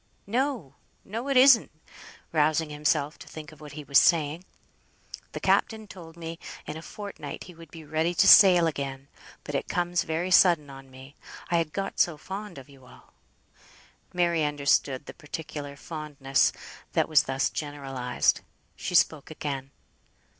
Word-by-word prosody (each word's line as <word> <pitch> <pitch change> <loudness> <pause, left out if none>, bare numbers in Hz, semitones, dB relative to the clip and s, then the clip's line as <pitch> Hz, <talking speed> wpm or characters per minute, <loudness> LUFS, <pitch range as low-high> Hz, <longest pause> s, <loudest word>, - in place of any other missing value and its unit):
"No, 240 - -2 0.3
it 245 +7 -2
isn't;" 255 -3 +7 0.6
rousing 155 0 +1
himself, 150 0 0
to - - -12
think 155 -1 -10
of 155 0 -17
what 150 -1 -10
he 150 +1 -7
was 140 0 +5
saying. 160 0 +2 0.9
"The - - -4
captain 220 -1 +1
told 170 -4 -12
me 165 0 -7 0.3
in - - -6
a 160 - -7
fortnight 205 +4 -8
he 180 - -12
would 165 -1 -14
be 160 0 -11
ready 160 +3 -1
to 195 - +4
sail 185 -6 +8
again; 140 -3 -4 0.3
but - - -7
it - - -2
comes 175 0 0
very 165 +3 -2
sudden 170 -6 +5
on 135 0 -12
me, 130 +2 -14 0.3
I 170 - +3
had 165 -2 -1
got 195 +3 -4
so 170 -3 +2
fond 195 +3 -7
of 135 - -11
you 135 -3 -18
all." - - -19 1.0
Mary 170 -3 +1
understood 140 -2 +1
the - - -9
particular 150 -2 -7
fondness 145 -3 -1 0.4
that - - +2
was 155 -1 +5
thus 135 0 -1
generalised. 135 -4 -1 0.3
She 180 - -4
spoke 155 -3 +2
again. 140 -3 -5
155 Hz, 155 wpm, -27 LUFS, 140-175 Hz, 1.0 s, sail